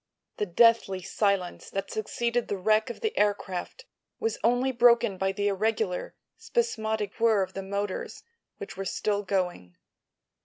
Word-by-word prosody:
The 210 - -1
deathly 195 -1 +4
silence 200 -3 -1
that 195 - -4
succeeded 235 +2 -1
the 200 - -2
wreck 215 +5 +2
of 240 - -7
the 440 -1 -1
aircraft 205 - -1 0.3
was 450 0 -1
only 245 +3 +3
broken 235 -4 +4
by 190 0 +1
the 205 +1 -1
irregular, 205 -1 -1 0.2
spasmodic 220 - -1
whirr 225 -4 +4
of 185 - -7
the 195 - -4
motors, 200 0 -4 0.3
which - - -8
were 195 - -4
still 205 +2 -1
going. 180 - -2
210 Hz, 145 wpm, -27 LUFS, 195-235 Hz, 0.3 s, deathly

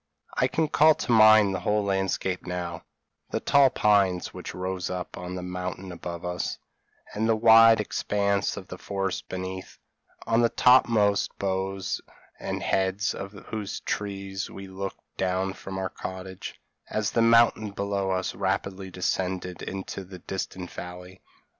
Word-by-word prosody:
I - - +2
can 160 -1 0
call 155 +1 +5
to - - -3
mind 110 -3 +7
the 95 - -2
whole 105 +3 +1
landscape 95 -2 -1
now: 90 -1 -4 0.5
the - - -1
tall 140 -1 +5
pines 100 -6 +2
which - - -7
rose 90 0 -3
up 90 -1 -5
on 90 +1 -6
the 90 - -5
mountain 90 +1 -5
above 85 0 -6
us, 90 0 -2 0.6
and 110 +2 0
the 115 - +4
wide 115 0 +7
expanse 100 -1 0
of - - -8
forest 95 -1 -3
beneath, 95 0 -6 0.5
on 115 +1 +3
the 115 - +4
topmost 115 -6 +4
boughs 95 0 -2 0.4
and - - -4
heads 95 +2 +1
of 100 +1 -7 0.2
whose 105 -3 -4
trees 100 -1 -4
we 95 0 -9
looked 95 +1 -6
down 95 +1 0
from 95 0 -7
our 95 0 -2
cottage, 95 0 -7 0.3
as 110 -1 -1
the 115 - +2
mountain 115 -2 +5
below 100 -1 -2
us 95 0 -1
rapidly 95 0 -2
descended 90 0 -2
into 95 0 -5
the 95 0 -10
distant 90 0 -5
valley. 90 +1 -9
95 Hz, 145 wpm, -26 LUFS, 95-105 Hz, 0.6 s, mind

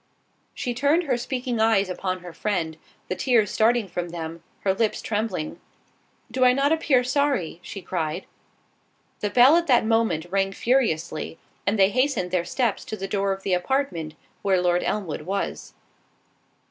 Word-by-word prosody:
She 250 -3 -2
turned 285 +8 +2
her 270 -6 +1
speaking 245 -1 -3
eyes 220 -3 +3
upon 185 0 -3
her 175 -1 -9
friend, 170 -7 -2 0.3
the 185 - -2
tears 235 -5 +2
starting 225 -1 +2
from 175 -1 -4
them, 165 -1 -6 0.2
her 190 - +2
lips 220 +2 0
trembling—"Do 215 +4 -5
I 250 0 +6
not 275 +3 +2
appear 295 -6 +3
sorry?" 255 - 0
she 195 +1 -8
cried. 170 0 -3 0.9
The 205 - -1
bell 250 +8 +7
at 340 0 0
that 245 -5 +4
moment 220 -8 +1
rang 195 0 +1
furiously, 170 -11 0 0.3
and 205 +2 +2
they 195 -1 +5
hastened 255 -7 +1
their 180 -2 +1
steps 240 -7 0
to 215 - -5
the 195 - -4
door 200 0 0
of 195 0 -4
the 190 - 0
apartment 180 - -1 0.3
where 190 -2 +2
Lord 175 0 +2
Elmwood 190 -9 -2
was. 195 +5 -4
200 Hz, 160 wpm, -24 LUFS, 180-250 Hz, 0.9 s, bell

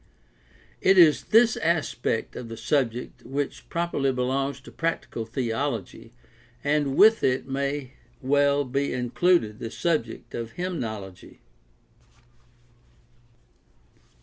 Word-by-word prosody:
It 190 0 +5
is 165 -4 +6
this 225 +1 +5
aspect 160 -8 -1
of 120 - -7
the 115 - -7
subject 125 -3 -1
which 140 +1 -4
properly 170 -5 0
belongs 135 +2 -1
to 135 - -13
prac 165 0 -2
tical 115 -1 -6
theology, 115 -3 -3 0.5
and 145 -1 +1
with 220 +2 +6
it 130 0 +1
may 140 0 -3 0.3
well 140 +1 +2
be 140 +2 -1
included 125 -2 +1
the 115 - -5
subject 165 +5 -2
of 115 -1 -5
hymnology. 110 - -6
135 Hz, 105 wpm, -25 LUFS, 120-150 Hz, 0.5 s, is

